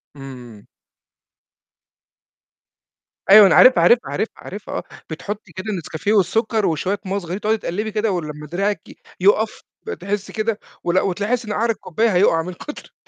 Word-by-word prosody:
إمم. 125 -6 -11 2.6
أيوه 205 0 +10
أنا 175 - +3
عارفها، 255 - +7
عارفها، 240 +1 +4
عارفها، - - -2
عارفها - - -7
آه، - - -4 0.3
بتحُطّي 205 -3 -6
كده 185 +2 -6
النسكافيه 170 +1 -2
والسُكَّر 215 +2 +1
وشوية 185 +5 -1
مَيّة 195 +1 -2
صغيرين، 175 +2 -5
تقعدي 220 +2 +1
تقلِّبي 210 +2 -4
كده 215 0 0
ولماّ 150 -4 -5
دراعِك 195 +5 -2
ي - - -12 0.2
يُقَف 210 +3 +2 0.2
ب 445 - -4
تحسّي 205 +1 -4
كده 220 -1 -1 0.2
ولأ 175 +1 +2
وتحسّي 210 +5 -1
إن 210 - -2
قَعْر 230 +2 0
الكوباية 220 0 0
هيُقَع 170 -3 +4
من 180 +3 -6
كتر 295 - -10
200 Hz, 150 wpm, -20 LUFS, 175-215 Hz, 2.6 s, أيوه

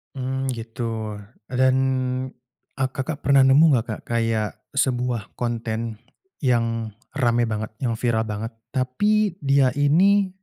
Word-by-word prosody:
Mmm, 130 0 -2
gitu. 115 -2 -4 0.3
Dan, 130 0 +3 1.0
ah, 135 - +2
Kakak 140 +3 -4
pernah 135 -1 +6
nemu 135 +4 +6
nggak, 115 -2 0
Kak, - - -17
kayak 115 -2 0 0.2
sebuah 125 -5 0
konten 115 -2 -3 0.4
yang 115 -4 0 0.2
rame 120 -3 +2
banget, 110 0 -3
yang 115 -3 -1
viral 115 -1 +1
banget, 110 +1 -5 0.2
tapi 205 +12 +1
dia 135 -2 +3
ini 185 +8 +4
125 Hz, 120 wpm, -23 LUFS, 115-135 Hz, 1.0 s, pernah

